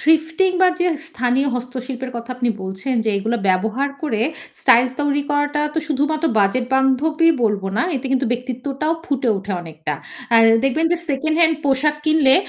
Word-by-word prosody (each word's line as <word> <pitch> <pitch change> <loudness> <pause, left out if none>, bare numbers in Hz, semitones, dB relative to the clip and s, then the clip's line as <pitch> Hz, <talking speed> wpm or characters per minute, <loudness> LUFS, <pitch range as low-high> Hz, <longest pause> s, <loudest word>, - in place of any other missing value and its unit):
Thrifting 320 +4 +2
বা 370 - +7
যে 355 - +2 0.2
স্থানীয় 255 0 0
হস্তশিল্পের 255 +1 -5
কথা 235 +1 -7
আপনি 245 -1 0
বলছেন 190 +8 -4
যে 220 - +1
এগুলো 225 +4 -1
ব্যবহার 220 +9 +1
করে 225 -8 -1 0.4
স্টাইল 255 -1 +5
তৈরি 290 0 +1
করাটা 290 0 0
তো - - +1
শুধুমাত্র 300 +3 0
বাজেট 225 +5 +2
বান্ধবই 305 +5 +3
বলব 205 -2 0
না। - - +2
এতে 265 - -5
কিন্তু 265 -1 +1
ব্যক্তিত্বটাও 260 +5 -3
ফুটে 265 -4 -1
উঠে 195 +1 -5
অনেকটা। 155 -2 -5 0.4
আ - - +8 0.3
দেখবেন 315 +5 +1
যে - - +2
সেকেন্ড 310 +3 0
হ্যান্ড 320 -2 +4
পোশাক 285 +2 +2
কিনলে 310 -4 +4
265 Hz, 165 wpm, -20 LUFS, 240-300 Hz, 0.4 s, আ